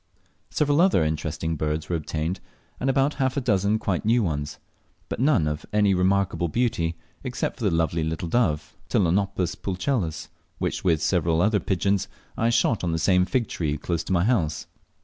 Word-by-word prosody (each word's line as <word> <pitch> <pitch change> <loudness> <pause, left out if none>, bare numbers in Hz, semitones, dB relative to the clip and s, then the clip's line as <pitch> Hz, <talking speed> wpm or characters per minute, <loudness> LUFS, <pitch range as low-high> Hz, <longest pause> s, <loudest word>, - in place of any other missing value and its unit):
Several 145 +1 +2
other 180 - +4
interesting 80 +1 -2
birds 75 0 -2
were 90 - -1
obtained, 80 +3 -3 0.4
and 135 - 0
about 135 +2 +2
half 130 +1 +1
a - - +4
dozen 105 -4 +2
quite 95 -4 -1
new 115 +2 +3
ones; 75 -5 -3 0.5
but - - -4
none 125 - +3
of 75 0 -3
any 105 -2 +3
remarkable 95 -1 +1
beauty, 85 -5 0 0.3
except 125 -2 -3
the 110 -4 +1
lovely 80 -1 0
little 80 +1 -3
dove, 80 -7 0
Ptilonopus 95 -1 +1
pulchellus, 90 - -2 0.3
which - - -2
with 80 -4 +2
several 85 -2 +2
other 105 +3 +3
pigeons 100 +1 0 0.3
I 115 - +1
shot 115 -2 +2
on 85 -2 0
the - - 0
same 90 +2 +3
fig 115 +5 0
tree 75 -3 -2
close 85 +2 -2
to - - -5
my 85 -1 +3
house. 90 -10 0
90 Hz, 170 wpm, -25 LUFS, 80-110 Hz, 0.5 s, other